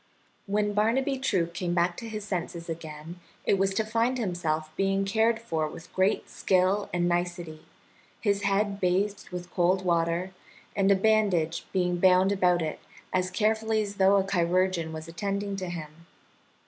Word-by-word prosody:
When 205 +1 0
Barnaby 255 +6 +1
True 195 -10 +1
came 175 +1 -3
back 175 0 +2
to 230 - -6
his 215 -1 -5
senses 175 -4 -4
again 160 +1 -7 0.3
it 195 - +2
was 195 0 +2
to 220 - +1
find 230 +3 +1
himself 160 -7 -2
being 195 0 +1
cared 220 +3 +2
for 160 -9 -2
with 165 +3 -11
great 190 +2 +1
skill 190 +2 +1
and 175 0 +1
nicety, 175 -2 -2 0.6
his 200 -2 +1
head 200 0 0
bathed 195 +3 0
with 180 -1 -7
cold 185 +2 +2
water, 170 +1 +1 0.4
and 195 -1 +2
a 200 - +6
bandage 195 -6 +1
being 180 -2 +1
bound 185 +1 +5
about 180 -3 +2
it 155 - -4 0.3
as 185 0 +1
carefully 220 +2 +1
as 200 -1 -7
though 195 +1 +5
a 195 - +2
chirurgeon 180 -2 +1
was 160 0 -7
attending 200 +4 -3
to 185 -2 -4
him. 165 -1 -8
185 Hz, 160 wpm, -27 LUFS, 175-205 Hz, 0.6 s, a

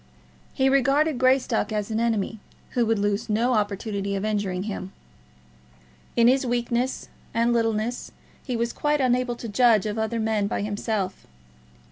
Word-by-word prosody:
He 265 -1 +3
regarded 275 +2 +3
Greystock 255 -3 +2
as 210 0 -2
an 220 - 0
enemy 225 -2 -1 0.3
who 240 -2 +1
would 225 0 +2
lose 205 +2 -1
no 230 +4 +2
opportunity 200 -1 -1
of 195 +1 -2
injuring 200 -4 -1
him. 195 -2 -5 1.2
In 235 0 +5
his 265 +2 +4
weakness 245 +1 -1 0.3
and 235 +1 +2
littleness 225 +1 -1 0.3
he 250 -3 -3
was 235 0 -1
quite 295 0 0
unable 250 -1 +1
to 235 - -7
judge 220 -1 +4
of 210 +1 -2
other 220 +1 -1
men 220 -2 0
by 200 - -2
himself. 205 -2 -3
225 Hz, 150 wpm, -25 LUFS, 210-245 Hz, 1.2 s, In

